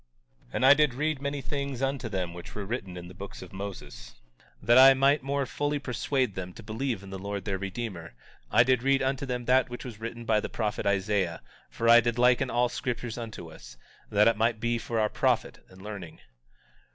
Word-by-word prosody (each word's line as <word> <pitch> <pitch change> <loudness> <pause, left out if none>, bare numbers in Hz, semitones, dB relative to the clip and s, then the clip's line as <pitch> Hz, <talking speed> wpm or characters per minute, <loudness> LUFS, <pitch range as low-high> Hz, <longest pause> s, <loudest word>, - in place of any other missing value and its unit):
19:23 - - -27
And 130 - +2
I 135 - +10
did 150 -3 +3
read 150 0 -1
many 140 0 -3
things 140 -1 -4
unto 135 -3 -1
them 90 -4 -3
which 85 0 -10
were 105 -2 -4
written 95 -5 -5
in 90 0 -8
the 90 - -11
books 100 +2 -9
of - - -13
Moses; 75 -12 -8 0.4
but - - -17
that - - +7
I 135 +1 +9
might 140 +2 +3
more 140 +1 -1
fully 145 +2 -1
persuade 130 -2 -1
them 90 -1 -6
to 115 - -12
believe 110 0 -3
in 95 - -10
the 95 - -6
Lord 100 0 -5
their 95 -2 -2
Redeemer 95 - -5 0.3
I 120 - +6
did 130 -1 +2
read 135 +1 +2
unto 135 +1 -1
them 125 -1 -3
that 130 +1 +3
which 120 +2 -7
was 115 -4 -8
written 115 +1 -6
by 110 -1 +3
the - - -4
prophet 105 -3 -2
Isaiah; 100 -3 0 0.3
for 115 - -2
I 120 0 +9
did 120 0 -1
liken 125 +1 +4
all 120 +1 +2
scriptures 120 -2 -4
unto 110 -8 -7
us, - - -13 0.3
that 105 +1 +4
it 115 -2 +3
might 115 0 +1
be 120 +1 0
for 115 0 -2
our 110 - +3
profit - - 0
and 95 0 -15
learning. 100 -6 -8
115 Hz, 220 wpm, -28 LUFS, 100-130 Hz, 0.4 s, I